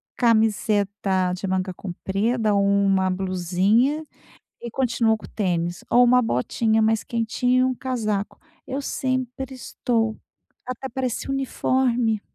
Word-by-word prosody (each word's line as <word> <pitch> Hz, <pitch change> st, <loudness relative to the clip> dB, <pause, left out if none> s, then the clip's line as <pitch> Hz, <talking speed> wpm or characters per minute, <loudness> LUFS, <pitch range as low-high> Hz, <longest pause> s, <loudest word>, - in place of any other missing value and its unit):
camiseta 205 Hz, -5 st, +1 dB
de 185 Hz, -, -5 dB
manga 185 Hz, 0 st, -1 dB
comprida 205 Hz, +5 st, -1 dB
ou 200 Hz, 0 st, +3 dB
uma 195 Hz, -1 st, +3 dB
blusinha, 190 Hz, -, +1 dB, 0.6 s
e 235 Hz, -, -5 dB
continuo 230 Hz, -3 st, +1 dB
com -, -, -11 dB
o -, -, -14 dB
tênis. 175 Hz, -4 st, -2 dB
Ou 245 Hz, -, +6 dB
uma 250 Hz, +1 st, +5 dB
botinha 220 Hz, -, +1 dB
mais 220 Hz, 0 st, +2 dB
quentinha 245 Hz, +2 st, 0 dB
e -, -, +4 dB
um 255 Hz, 0 st, +1 dB
casaco. 215 Hz, -6 st, -3 dB, 0.3 s
Eu 270 Hz, +2 st, -3 dB
sempre 260 Hz, 0 st, -3 dB
estou 225 Hz, -3 st, -1 dB, 0.5 s
até 255 Hz, +1 st, -4 dB
parece 255 Hz, 0 st, -3 dB
uniforme. 250 Hz, -4 st, 0 dB
225 Hz, 125 wpm, -23 LUFS, 195-250 Hz, 0.6 s, Ou